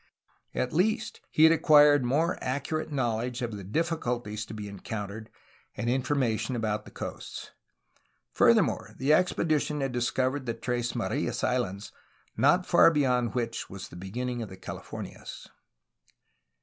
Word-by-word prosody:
At 125 - -1
least, 195 +7 0
he 155 - +3
had 160 - +8
acquired 150 -3 +6
more 150 +8 +1
accurate 145 +5 -2
knowl 120 -6 0
edge 125 +1 -4
of 115 -3 -3
the 100 - -7
difficulties 120 - -2
to - - -8
be 105 -1 -6
encountered 105 +2 -6 0.5
and 120 0 0
information 125 -3 0
about 110 -2 -2
the - - -11
coasts. - - -7 0.8
Furthermore, - - +3
the 140 +4 +3
expedition 155 -3 +1
had 135 -2 -2
discov 130 +2 0
ered 130 - -12
the 115 - -1
Tres 120 -1 -2
Marias - - -2
Islands, 105 -5 -1 0.4
not 145 +10 +4
far 175 - +6
beyond 125 -7 +1
which 115 -2 -2
was 95 -1 -8
the - - -12
beginning 120 +7 -4
of 110 - -5
the 95 - -10
Calif 95 - -8
ornias. - - -8
125 Hz, 150 wpm, -28 LUFS, 110-145 Hz, 0.8 s, had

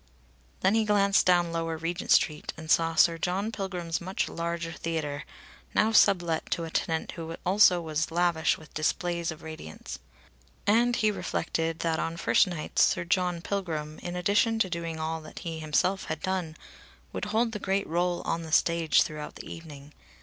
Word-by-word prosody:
Then 190 +2 +3
he 225 0 +3
glanced 200 -2 +3
down 175 -2 +4
Lower 165 -1 -2
Regent 165 +2 -4
Street 150 -1 +2
and 160 0 -5
saw 165 0 +3
Sir 165 0 +4
John 190 +6 -1
Pilgrim's 180 -6 -3
much 185 +3 -2
larger 170 0 -3
theatre, 155 -3 -3 0.5
now 220 - +4
sublet 175 -6 +3
to 170 - -1
a 165 - -6
tenant 160 0 -1
who 165 -1 -6
also 185 -1 +5
was 160 0 -1
lavish 170 -1 +2
with 155 - -16
displays 170 +2 -1
of 160 0 -7
radiance. 155 - -8 0.7
And 235 +4 +4
he 215 -2 +2
reflected 165 -4 -2
that 165 -1 0
on 165 0 -2
first 170 - +4
nights 170 -4 -1
Sir 170 - +3
John 180 -1 0
Pilgrim, 160 -6 -3
in 175 0 -5
addition 205 +5 +2
to 190 -5 +1
doing 165 -2 -4
all 160 +1 -2
that 155 - -13
he 165 -1 -4
himself 160 +5 0
had 160 -1 -5
done, 185 -4 -2 0.6
would - - -3
hold 225 +3 +1
the 210 - -4
great 195 0 -1
rôle 175 +1 0
on 170 - -1
the 160 -1 -8
stage 170 0 +4
throughout 150 -1 -7
the - - -9
evening. 150 -3 -10
170 Hz, 175 wpm, -28 LUFS, 160-190 Hz, 0.7 s, also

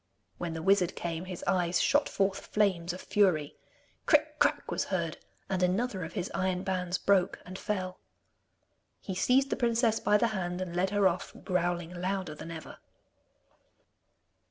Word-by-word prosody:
When 170 -2 -3
the 160 - -5
wizard 195 -2 +3
came, 170 0 -4
his 185 -2 -7
eyes 175 -2 +2
shot 290 0 +3
forth 195 -1 -1
flames 185 -5 +1
of 180 - -7
fury. 180 -8 +2 0.5
Cric - - +3
crac - - +2
was - - 0
heard, - - -2 0.3
and 190 -1 -1
another 190 +2 +1
of 160 - -7
his 185 -3 -3
iron 185 -1 0
bands 180 -1 -1
broke 190 -2 +2
and 185 +1 -8
fell. 185 -3 -3 1.0
He 190 - -5
seized 260 +8 +3
the - - +2
princess 230 -2 +2
by 210 - +4
the 235 +2 +2
hand 180 -4 -3
and 180 -2 -4
led 185 +2 +2
her 205 -1 +4
off, 180 0 -3
growling 175 -2 -1
louder 185 -2 -2
than 150 - -9
ever. 160 -1 -8
185 Hz, 160 wpm, -30 LUFS, 175-200 Hz, 1.0 s, by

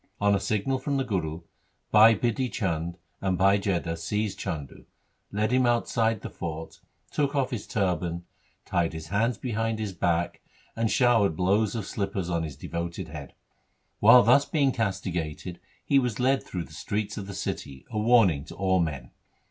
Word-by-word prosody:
On 100 0 +3
a 100 - +2
signal 110 +7 -1
from 140 +1 -1
the 135 - +1
Guru, 85 -9 -2 0.5
Bhai 110 +1 +8
Bidhi 120 +4 -1
Chand 85 -3 -2 0.2
and 95 -2 0
Bhai 100 +2 +4
Jetha 85 -4 -1
seized 105 +5 -2
Chandu, 75 -5 -5 0.5
led 105 +3 0
him 130 -1 +3
outside 115 -2 +1
the - - -6
fort, 80 -1 -6 0.3
took 145 -1 0
off 135 -1 +1
his 115 -5 -4
turban, 90 -4 -1 0.4
tied 85 -2 0
his 80 -1 -7
hands 115 +4 +1
behind 115 0 -2
his 105 -3 -4
back, 85 -1 0 0.3
and 115 -1 0
showered 115 -8 +3
blows 100 +5 +1
of 110 -4 -3
slippers 100 -4 -3
on 85 -1 0
his 75 -4 -5
devoted 85 +3 -5
head. 75 -3 -9 0.6
While 125 - +8 0.3
being 145 -4 +3
thus - - -10
castigated 90 -5 -3 0.3
he 140 - +4
was 125 -4 -2
led 135 +2 +3
through 90 -2 -5
the - - -14
streets 105 0 -3
of 100 - -7
the 100 - -7
city, 70 -6 -5
a 110 - -1
warning 105 -10 +4
to - - -10
all 95 -1 +2
men. 70 -7 -2
100 Hz, 170 wpm, -27 LUFS, 85-115 Hz, 0.6 s, Bhai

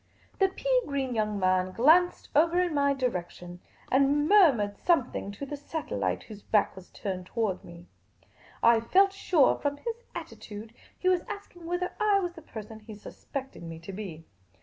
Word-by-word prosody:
The 385 - +5
pea - - +1
green 270 -3 -2
young 215 -2 -1
man 185 0 +2
glanced 325 - +4
over 335 +4 +4
in 355 -2 +1
my 280 -1 +2
direction, 180 -8 -4 0.3
and 280 +3 +3
murmured 280 - +5
something 265 - +1
to 280 - -6
the 290 - -5
satellite, 100 - -3
whose 210 -2 -11
back 210 0 +1
was 190 -1 -12
turned 185 -2 -5
towards 215 -5 -1
me. 170 0 -12 0.8
I 230 0 +6
felt 385 - +4
sure, 350 -7 +3
from 285 0 -1
his 465 +6 -5
attitude, 215 +2 -8 0.2
he 370 - -2
was 365 -2 +4
asking 400 -5 -8
whether 355 +1 -1
I 420 -2 +4
was 355 -2 -3
the 330 - -12
person 220 -6 -9
he 215 0 -11
suspected 265 +5 -8
me 165 -1 -7
to 170 +4 -9
be. 180 -6 -7
265 Hz, 170 wpm, -28 LUFS, -, 0.8 s, I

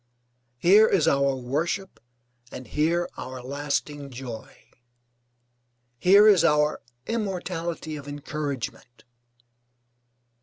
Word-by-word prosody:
Here 200 - +6
is 185 -8 +2
our 140 -1 +2
worship 155 +10 -3 0.5
and 130 - -8
here 170 +3 0
our 130 0 -7
lasting 140 +1 -3
joy, 120 -4 -9 1.4
here 200 - +6
is 195 -5 +6
our 150 -2 +2 0.2
immortality 180 -7 -3
of 145 -1 -10
encouragement. 145 -4 -6
150 Hz, 85 wpm, -25 LUFS, 140-175 Hz, 1.4 s, Here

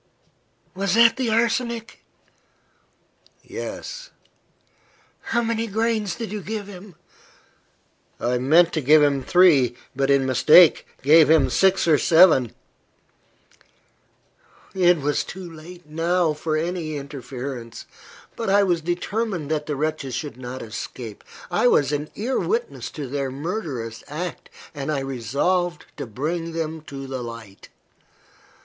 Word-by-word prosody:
"Was 195 +1 -1
that 230 0 +6
the 255 -3 -1
arsenic?" 230 0 -1 1.4
"Yes." - - -7 1.2
"How 235 +1 0
many 230 0 -1
grains 220 -2 -1
did 225 -4 -6
you 210 -1 -4
give 210 +1 -5
him?" 195 -2 -12 1.2
"I 125 +1 0
meant 165 +7 +4
to 155 - 0
give 150 +3 +5
him 140 -2 +2
three, 140 -6 +4 0.2
but, 135 +1 0
in 140 -1 +3
mistake, 150 +6 +6 0.2
gave 155 +1 +6
him 145 -5 +4
six 190 +9 +3
or 155 -3 +4
seven." 160 - +5 2.2
It 180 -2 +4
was 145 0 -1
too 185 -1 -8
late, 170 +2 -12
now, 165 +1 +1
for 155 +1 -2
any 165 -1 -3
interference. 130 -3 -7 0.5
But, 230 -3 -3
I 200 +1 +4
was 175 -4 +1
determined 175 -1 -3
that 150 -1 -2
the 150 - -2
wretches 140 -3 -3
should 145 -2 -5
not 130 +1 -7
escape. 115 0 -8 0.3
I 175 +7 +3
was 145 - +3
an 150 +1 -3
ear 245 +5 -1
witness 465 +3 -2
to 150 - -5
their 140 +1 -3
murderous 135 - -5
act, 165 +4 -6 0.2
and 145 0 -4
I 140 -3 -1
resolved 140 +8 -1
to - - -5
bring 165 +8 -3
them 160 -1 -4
to 135 -1 -7
the 130 -1 -5
light. 115 -4 -10
160 Hz, 130 wpm, -23 LUFS, 135-185 Hz, 2.2 s, that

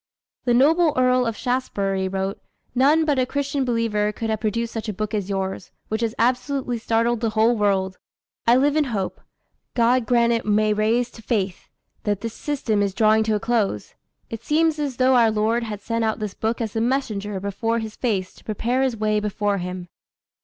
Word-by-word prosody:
The 240 -1 +3
noble 310 +5 +4
Earl 255 -1 +3
of 225 -2 -3
Shaftesbury 200 -7 -1
wrote, 195 +1 -3 0.3
"None 290 +6 +4
but 290 -4 +1
a 255 - +3
Christian 280 0 -1
believer 230 -4 0
could 225 +1 -3
have 220 - -1
produced 230 +2 -2
such 225 -1 -4
a - - -2
book 215 +3 -4
as 205 -2 -2
yours, 190 -2 -3 0.2
which 220 +1 -2
has 230 0 -1
absolutely 250 +1 0
startled 230 +1 +1
the 230 -1 0
whole 220 +2 +3
world.... 195 -3 0 0.5
I 235 - +7
live 285 +3 +3
in 310 -1 +3
hope 205 -7 -3 0.5
God 240 0 +3
grant 235 -1 +3
it 230 - 0
may 215 0 +2
rise 230 +3 +1
to 225 - -13
faith! 200 -5 -2 0.3
that 205 -2 -1
this 230 -1 -4
system 250 -8 -1
is 200 -2 -1
drawing 220 +1 +4
to 215 -1 +1
a - - 0
close. 220 - -1 0.4
It 225 - -6
seems 315 0 +2
as 280 -4 -2
though 260 0 +4
our 235 -2 +5
Lord 220 +2 +1
had 210 -2 -6
sent 230 +2 -1
out 220 -1 0
this 210 -2 -4
book 225 +2 -2
as 220 -2 -3
the 225 - -1
messenger 215 -6 -1
before 215 +4 -1
His 220 -2 -5
face 200 -7 -1
to - - -19
prepare 235 +4 -1
His 260 -4 0
way 215 0 +1
before 205 -1 -1
Him." 180 0 -5
225 Hz, 200 wpm, -23 LUFS, 210-245 Hz, 0.5 s, I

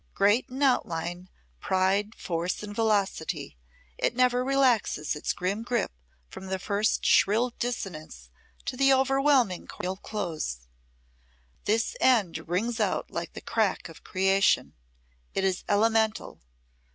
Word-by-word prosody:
Great 205 +7 +3
in 265 +3 -3
outline, 175 -8 0 0.3
pride, 195 - +1
force 175 +3 -3
and 205 0 -7
velocity, 195 - -1 0.4
it - - 0
never 250 0 +3
relaxes 255 - +1
its 150 - -2
grim 195 +4 -2
grip 240 -1 -1 0.4
from 190 - -10
the 190 0 -2
first 205 +3 0
shrill 230 +5 +4
dissonance 155 - -5 0.3
to 255 - -3
the 275 +1 +4
overwhelming 265 -6 +3
chordal 185 +1 -5
close. 165 - -4 1.0
This 225 - +1
end 180 -11 +2
rings 225 +7 -1
out 215 - -1
like - - -5
the - - -8
crack - - -1
of - - -14
creation. 195 0 +2 0.6
It 195 - 0
is 190 -1 0
elemental. 220 +1 +1
205 Hz, 125 wpm, -27 LUFS, 180-240 Hz, 1.0 s, shrill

